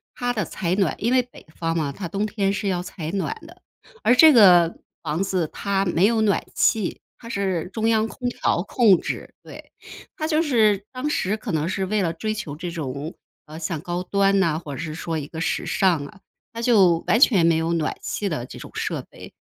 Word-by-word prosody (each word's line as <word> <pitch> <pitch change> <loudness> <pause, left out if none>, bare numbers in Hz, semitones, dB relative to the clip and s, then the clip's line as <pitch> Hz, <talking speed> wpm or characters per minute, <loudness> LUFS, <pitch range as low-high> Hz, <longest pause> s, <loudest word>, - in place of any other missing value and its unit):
它 245 0 -1
的 210 -3 -1
采 175 -1 -2
暖， 195 -2 +1
因 235 +4 0
为 255 - +5
北 245 - -15
方 165 0 -1
嘛， 150 -3 -1
它 175 +5 -6
冬 200 +4 -2
天 200 -2 -1
是 205 0 -3
要 180 -2 0
采 165 -3 -6
暖 185 -6 -2
的。 345 +3 -15 0.4
而 245 - +5
这 315 +2 +8
个 175 -7 +6 0.3
房 155 +4 -1
子 185 -4 -1
它 195 -1 -1
没 175 +1 +2
有 225 -1 +1
暖 205 -3 +2
气， 215 -5 +1 0.2
它 230 - -11
是 190 -5 -2
中 225 0 -1
央 220 -1 +2
空 245 +2 -5
调 175 -7 0
控 210 -5 +4
制， - - -6
对。 - - -12 0.5
它 310 - -2
就 315 0 +2
是 215 - +2
当 260 +3 -3
时 210 -7 -1
可 215 -2 -6
能 160 +2 -1
是 190 0 -1
为 210 +1 0
了 170 - 0
追 215 +6 -3
求 170 -9 -6
这 175 +2 -5
种， 150 -1 -5 0.3
呃， 155 +1 -10
像 165 -1 -3
高 175 +2 -4
端 195 +1 +2
呐， 160 -4 +1
或 150 -4 -8
者 - - -6
是 160 -2 -5
说 165 0 -4
一 145 - -5
个 160 - -8
时 165 - -1
尚 175 -7 +1
啊， 190 +7 -13 0.3
它 230 - -6
就 195 -8 +5
完 - - +4
全 190 -12 +5
没 165 -1 +4
有 160 +1 0
暖 160 -2 -1
气 205 - -3
的 155 -10 -3
这 - - -11
种 - - -10
设 - - -3
备， - - -13
190 Hz, 235 characters per minute, -23 LUFS, 165-215 Hz, 0.5 s, 这